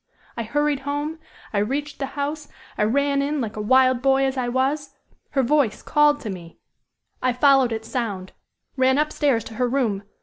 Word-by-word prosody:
I 235 - -3
hurried 295 +5 0
home. 290 +3 -3 0.3
I 205 - +2
reached 285 +8 -2
the 275 - -2
house. 295 +1 -3 0.3
I - - -3
ran 280 +4 +1
in 290 +1 -1
like 225 -4 -3
a 215 - -4
wild 255 +2 +4
boy 270 0 +3
as 265 0 -1
I 255 -2 -1
was. 275 +3 -1 0.3
Her 270 -2 +1
voice 265 -4 +1
called 295 -2 +3
me. 180 -5 -7 0.6
I 255 -1 +1
followed 265 -1 +4
its 225 0 -4
sound 200 -7 -3 0.4
ran 260 0 +3
up 300 +1 +1
stairs 270 -7 +1
to - - -10
her 250 - +2
room. 235 -7 0
265 Hz, 180 wpm, -23 LUFS, 235-285 Hz, 0.6 s, wild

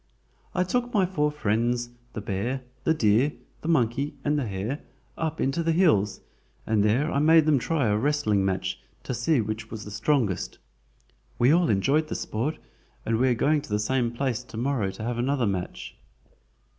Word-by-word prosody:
"I 180 - +3
took 245 +6 -1
my 195 -3 +4
four 150 -5 0
friends, 120 -1 0 0.2
the 110 - -4
bear, 110 +6 -2 0.2
the 160 - +4
deer, 120 +3 +3 0.3
the - - -6
monkey, 140 -1 +1
and 150 0 +2
the 130 - -2
hare, 105 +9 -3 0.4
up 160 -1 -3
into 135 +5 0
the 165 0 +1
hills, 150 - +3 0.4
and 110 -2 +2
there 125 +9 +2
I 140 - +1
made 160 +1 +6
them 150 -3 +4
try 150 +1 0
a 105 - +2
wrestling 110 -5 +1
match, 95 -1 -1 0.2
to - - -3
see 125 +3 +2
which 110 +1 -4
was 110 -1 -7
the 105 - -8
strongest. 110 - 0 0.8
We 125 +3 +4
all 170 +1 +4
enjoyed 140 +10 +2
the - - -4
sport, 125 +9 -2 0.5
and 115 +1 +1
are 130 -1 +4
going 150 +5 +2
to - - -12
the 105 - +1
same 120 +3 0
place 125 -1 -2
to 115 - -10
morrow 120 -5 0
to 110 - -7
have 120 +1 -2
another 130 0 +1
match." 95 -3 -4
125 Hz, 180 wpm, -26 LUFS, 110-150 Hz, 0.8 s, made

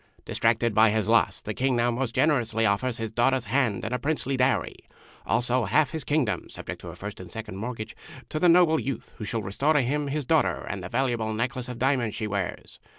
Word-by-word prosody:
Distracted 115 0 +1
by 110 +1 +6
his 105 -1 0
loss, 115 +1 +3
the 110 - -4
King 130 +3 +1
now 120 0 +2
most 120 -1 -2
generously 115 -7 +2
offers 110 +5 +1
his 115 -2 -4
daughter's 125 +2 +2
hand 125 -9 0
and 110 - -3
a 125 - 0
princely 140 -1 -1
dowry, 130 0 +1 0.5
also 125 0 +1
half 150 -4 +2
his 160 -3 -4
Kingdom 130 - 0
(subject - - -7
to - - -9
a 85 - -9
first 100 +3 -7
and 90 - -9
second 110 -4 -7
mortgage), 110 0 -5 0.3
to 155 - -2
the 175 - +5
noble 170 -2 +5
youth 135 - -5
who 105 - -4
shall 110 +1 -2
restore 135 +11 +1
to 150 - +4
him 145 +4 -1
his 145 0 -2
daughter 160 +2 +2
and 100 - -4
the 90 - -6
valuable 120 -4 0
necklace 125 +2 -2
of 125 - -6
diamonds 125 -4 +1
she 110 - -3
wears. 100 -3 -4
120 Hz, 215 wpm, -26 LUFS, 110-135 Hz, 0.5 s, by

